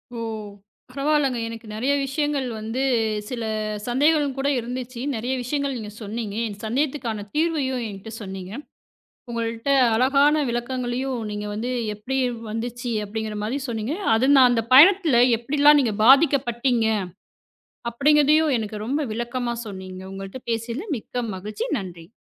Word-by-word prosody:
ஓ! - - -5 0.7
பரவால்லங்க. 275 -1 +1
எனக்கு 230 0 -8
நெறைய 255 +6 +1
விஷயங்கள் 285 0 -1
வந்து 225 +4 -3 0.5
சில 240 -3 -4 0.4
சந்தேகங்கள் 285 +2 +2
கூட 275 +1 0
இருந்துச்சு. 245 +1 -6 0.2
நெறைய 240 +4 -2
விஷயங்கள் 280 +2 -2
நீங்கச் 210 -1 -8
சொன்னீங்க. 210 0 -4
என் 205 - -6
சந்தேகத்துக்கான 240 -3 -2
தீர்வையும் 295 -6 0
என்கிட்ட 205 +2 -9
சொன்னீங்க. 190 -2 -7 0.8
உங்கள்ட்ட 230 +2 -3 0.2
அழகான 275 +5 +4
விளக்கங்களையும் 250 +1 -2
நீங்க 210 0 -4
வந்து 225 +4 -3 0.2
எப்படி 230 +6 -4 0.3
வந்துச்சு 240 +2 -4
அப்டிங்கற 215 0 -4
மாரி 240 +7 -2
சொன்னீங்க. 230 +5 -2 0.2
அது 230 +4 +2
நான் 255 -2 +7
அந்தப் 230 -1 0
பயணத்துல 320 -3 +7 0.2
எப்டிலாம் 290 +4 +5
நீங்கப் 215 -4 -1
பாதிக்கப்பட்டீங்க 255 -4 +4 1.1
அப்டிங்கறதையும் 295 +3 +4
எனக்கு 215 -1 -4
ரொம்ப 285 +4 0
விளக்கமா 240 +1 -2
சொன்னீங்க. 190 -2 -8
உங்கள்ட்ட 195 +6 -7
பேசியதுல 230 - -3
மிக்க 245 +2 -4
மகிழ்ச்சி. 210 - -5
நன்றி. 180 -1 -9
240 Hz, 125 wpm, -23 LUFS, 220-275 Hz, 1.1 s, நான்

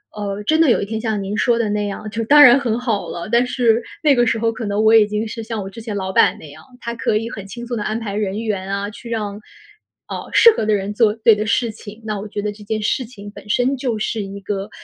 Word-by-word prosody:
呃， 205 -1 -4
真 315 +9 +2
的 325 -5 +5
有 - - +2
一 - - -2
天 220 +1 -4
像 220 -3 -2
您 205 +3 -3
说 235 -1 +2
的 220 -2 0
那 210 0 -1
样， 205 +1 -5
就 225 +2 -3
当 295 +5 +7
然 255 0 +8
很 235 -3 -1
好 230 -5 -2
了， 170 +2 -6
但 240 +1 +4
是 235 -2 +2 0.2
那 295 -2 +5
个 240 -1 +3
时 230 - +1
候 230 0 +1
可 225 0 -6
能 205 +1 0
我 220 - +5
已 210 -2 +6
经 210 +1 -2
是 225 +1 -6
像 220 -2 -4
我 195 - -6
之 195 - -11
前 220 -2 -5
老 190 -1 -3
板 - - +3
那 150 - -11
样， - - -14 0.2
他 235 - -4
可 225 - 0
以 225 +2 -1
很 200 -4 -8
轻 240 +4 -8
松 240 -1 -3
地 210 - -3
安 215 +1 -2
排 210 -3 -5
人 205 0 -2
员 200 -4 -3
啊， 200 +1 -2
去 230 +3 -11
让， 210 -3 -3 0.7
呃， - - -6
适 465 - +8
合 - - 0
的 215 - +2
人 200 0 -1
做 215 -1 +3
对 225 0 +4
的 215 +1 -2
事 230 +1 +1
情。 215 +1 -12
那 215 -2 -3
我 210 - -6
觉 205 0 -4
得 210 0 -2
这 210 0 -13
件 215 +1 -3
事 245 +4 0
情 205 -3 -11
本 210 - -13
身 250 +4 +1
就 245 -4 -2
是 215 0 -2
一 195 +1 -7
个， 195 0 -4
215 Hz, 305 characters per minute, -19 LUFS, 205-230 Hz, 0.7 s, 然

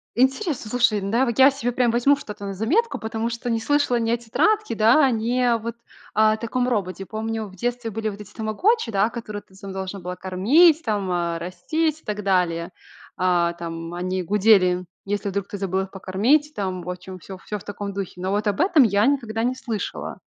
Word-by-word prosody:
Интересно, 265 - +1
слушай, 235 -4 +2
да, 225 +7 +1
вот 235 0 -2
я 265 +1 +9
се 245 -3 -2
прям 245 0 +2
возьму 245 +5 +4
что-то 210 -7 -8
на 195 - -4
заметку, 305 - 0
потому 225 +1 -3
что 235 +1 -4
не 230 -1 +1
слышала 285 -1 +1
ни 230 0 0
о 235 - +2
тетрадке, 305 - +1
да, 240 +6 +5
ни 235 +2 0
о 240 -2 +3
вот, 230 +1 -5 0.4
а, 215 0 +4
о - - -2
таком 245 +2 -1
роботе. 195 -4 -2
Помню, 220 0 -3
в 190 - -14
детстве 240 +3 -2
были 220 0 -3
вот 205 0 -8
эти 205 - -12
тамагочи, 230 - 0
да, 200 +2 +2
которые 215 -3 -6
ты 190 -1 -23
сама 195 0 -8
должна 190 +1 -5
была 180 +1 -5
кормить 280 - +4
там, 205 -4 -1
э, 170 -1 -1
растить 305 - -2
и - - -36
так 210 -1 -3
далее. 175 -3 +1 0.5
А, 175 -2 +2
там, 165 0 -6
они 185 +1 -2
гудели, 185 -2 +3 0.2
если 205 0 -2
вдруг 200 0 -3
ты 205 - -6
забыл 190 -1 -1
их 190 - -5
покормить. 230 +11 +1
Там, 185 - -3
в 180 - -7
общем, 185 +1 -8
всё 185 +1 -10
всё 210 +2 -5
в - - -12
таком 205 0 -5
духе. 190 -2 -6
Но 185 - -2
вот 210 +2 0
об 205 +9 +1
этом 345 -7 +5
я 205 +2 +3
никогда 230 -6 0
не 250 +2 0
слышала. 230 -5 -5
215 Hz, 210 wpm, -23 LUFS, 190-245 Hz, 0.5 s, я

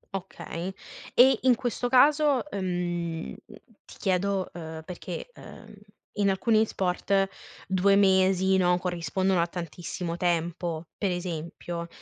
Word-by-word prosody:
Okay. 185 -1 -5 0.4
E 260 +2 +6
in 255 -2 +5
questo 245 0 -2
caso, 285 +1 +4
ehm, 175 -3 -3 0.5
ti - - -14
chiedo, 190 0 0
ehm, 160 -2 -7
perché, 185 - -7
ehm, - - -13 0.4
in 200 -1 +3
alcuni 220 +3 +2
sport 195 +1 0 0.4
2, 190 +1 +3
mesi 190 -1 +4
no, 180 -1 +3
corrispondono 180 +1 0
a 170 - +1
tantissimo 170 0 -5
tempo. 170 -1 -1
Per 200 - +1
esempio, 170 -1 -4
185 Hz, 115 wpm, -27 LUFS, 175-200 Hz, 0.5 s, E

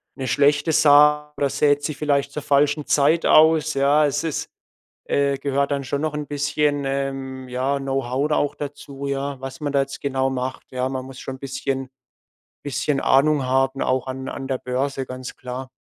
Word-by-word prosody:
'ne 130 -2 -4
schlechte 145 +4 +3
Saat 150 -1 +5
oder 140 - +1
sät 145 +1 +2
sie 155 - -2
vielleicht 140 -1 0
zur 150 0 -5
falschen 145 +1 +2
Zeit 150 +4 +3
aus, 155 0 +5
ja. 140 +2 +3
Es 145 0 -1
es, 160 -3 -3 0.6
äh, 140 -1 +1
gehört 140 0 0
dann 140 -1 -1
schon 140 +2 -3
noch 155 -1 -1
'n 150 -1 -4
bisschen, 145 0 0
ähm, 135 -1 -3
ja, 130 +3 -1
Know-How 135 0 -1
da 150 - +2
auch 145 - 0
dazu, 140 -1 -7
ja, 140 0 -3
was 135 0 -7
man 145 -1 -2
da 140 - +4
jetzt 135 0 -5
genau 135 -1 0
macht, 130 0 -5
ja. 130 0 -1
Man 130 -1 -4
muss 130 -1 -10
schon 135 - -6
'n - - -29
bisschen 135 -1 -3 0.7
bisschen 145 0 -1
Ahnung 140 +1 +3
haben 135 +1 +1
auch 130 0 0
an 130 0 -5
an 135 - -6
der 130 -2 -1
Börse, 135 +2 -2
ganz 130 0 -8
klar. 130 +1 -7
140 Hz, 190 wpm, -22 LUFS, 135-145 Hz, 0.7 s, Saat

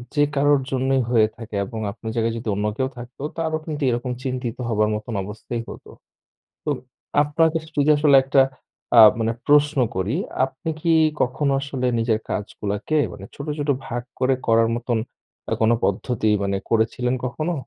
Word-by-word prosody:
যে 145 - +4
কারোর 145 0 +4
জন্যই 130 0 +1
হয়ে 110 -3 +4
থাকে 115 -2 -8
এবং 110 +2 -6
আপনের 110 +2 -7
জায়গায় 115 0 +1
যদি 115 - -7
অন্য 105 +1 -1
কেউ 130 -1 +1
থাকতো 120 +2 -10 0.2
তারও 160 -1 0
কিন্তু 150 -2 -4
এরকম 120 +1 -1
চিন্তিত 125 -3 -3
হবার 105 -1 +2
মতো 105 - -6 0.2
অবস্থাই 110 +3 -5
হতো। - - -10 0.8
তো 150 - -1 0.5
আপনাকে 160 +2 +2
আস - - -13
যদি 145 +1 +3
আসলে 145 -2 +5
একটা 135 0 +4 0.6
আ - - +9 0.2
মানে 115 0 0
প্রশ্ন 145 0 +4 0.2
করি, 95 +7 -1 0.3
আপনি 135 +4 -7
কি 170 - 0 0.3
কখনো 135 +3 0
আসলে 135 -2 -3
নিজের 115 -1 +1
কাজগুলাকে 105 +6 -3 0.2
মানে 100 -1 -9
ছোট, 140 - -7
ছোট 145 0 -3 0.2
ভাগ 120 -1 -3 0.2
করে 130 +1 +3
করার 115 0 +4
মতন 120 -1 -1 0.5
আ - - -1
কোন 110 +1 +4
পদ্ধতি 110 +3 0
মানে 100 0 0
করেছিলেন 115 +2 +1
কখনো? 155 +8 -2
125 Hz, 165 wpm, -22 LUFS, 115-145 Hz, 0.8 s, আ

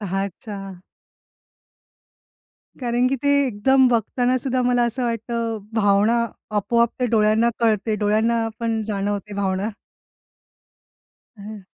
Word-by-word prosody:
अच्छा. 200 +1 -4 2.2
कारण 245 0 0
की 270 - 0
ते 285 - +1 0.2
एकदम 260 +4 +3
बघतांना 245 +2 +1
सुद्धा 255 0 -1
मला 245 0 +2
असं 240 +2 -3
वाटतं, 230 -1 -2 0.2
भावना 215 +2 +3 0.3
आपोआप 235 +3 +2
ते 250 - +2
डोळ्यांना 220 0 +3
कळते, 220 -1 +1
डोळ्यांना 220 +2 +1
पण 225 -1 -1
जाणवते 205 0 -3
भावना. 195 +1 -1 1.7
हं. 210 +1 -9
225 Hz, 100 wpm, -22 LUFS, 205-235 Hz, 2.2 s, एकदम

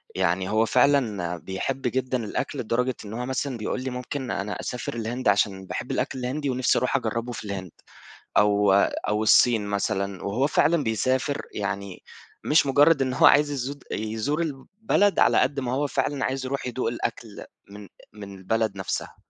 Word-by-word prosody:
يعني، 95 0 0
هو 110 +1 +3
فعلًا 110 -9 +2
بيحِب 95 +10 -4
جدًا 130 0 -1
الأكل، 105 - -3
لدرجة 125 +2 0
إن 105 - -8
هو 120 +2 -3
مثلًا 130 0 -2
بيقول 115 +3 -3
لي: 130 - -2
"ممكن 125 +1 -5
أنا 100 +2 -3
أسافر 125 -1 -4
الهند، 120 +1 -3
عشان 100 -2 +2
باحِب - - -5
الأكل 130 - -2
الهندي، 135 +3 -2
ونفسي 130 -1 +2
أروح 125 - 0
أجرِّبه 115 -1 -2
في 110 - -6
الهند، 95 -4 -5 0.7
أو 105 -1 +4
أو 105 +2 +1
الصين 110 -1 +4
مثلًا." 100 -1 -2
وهو 115 +8 +1
فعلًا 155 +1 +2
بيسافر 130 +5 0
يعني، 100 -2 -4 0.4
مش 150 -1 +4
مجرَّد 145 +2 +4
إنه 130 -1 -1
هو - - +6
عايز 145 0 +6
يزود 140 0 -4
يزور 110 +9 -2
البلد، 195 +7 0
على - - +5
قدر 140 -1 +1
ما 125 -1 -2
هو 145 +2 0
فعلًا 140 -1 -1
عايز 135 0 -2
يروح 135 0 -3
يدوق 125 -1 -2
الأكل 115 - -4 0.2
من 100 0 -11 0.3
من 100 -2 -9
البلد 105 +1 -1
نفسها. 95 - -4
120 Hz, 170 wpm, -25 LUFS, 105-135 Hz, 0.7 s, هو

